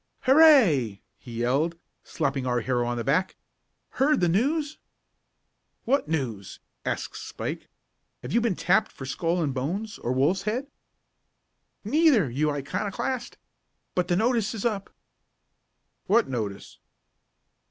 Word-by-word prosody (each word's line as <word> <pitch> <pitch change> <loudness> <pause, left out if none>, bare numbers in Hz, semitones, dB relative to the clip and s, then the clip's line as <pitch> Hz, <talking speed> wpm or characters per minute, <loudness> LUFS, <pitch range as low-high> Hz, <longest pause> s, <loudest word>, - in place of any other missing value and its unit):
"Hurray!" 250 - +5 0.2
he 125 - -12
yelled, 145 +8 +1 0.3
slapping 135 -2 -2
our 120 -1 +1
hero 120 0 0
on 120 0 -2
the 115 - -2
back. 165 +9 +1 0.7
"Heard 295 +2 +4
the 175 - +2
news?" 290 - 0 1.1
"What 275 - +1
news?" 120 -11 -3 0.2
asked - - -3
Spike. - - -6 0.5
"Have 125 - -5
you 235 - +3
been 225 -5 +1
tapped 210 +6 +2
for 135 - -9
Skull 170 +5 -1
and 140 -3 -1
Bones, 185 +12 -3
or 120 - -2
Wolf's 145 +9 +2
Head?" 220 +7 -2 1.2
"Neither, 285 - +3
you 145 +5 0
old 145 - -2
iconoclast. 210 - -3 0.6
But 180 -1 0
the 175 - +1
notice 225 +1 +1
is 215 - -5
up." 210 -4 -1 1.2
"What 225 +3 +4
notice?" 110 -6 -5
175 Hz, 130 wpm, -26 LUFS, -, 1.2 s, Hurray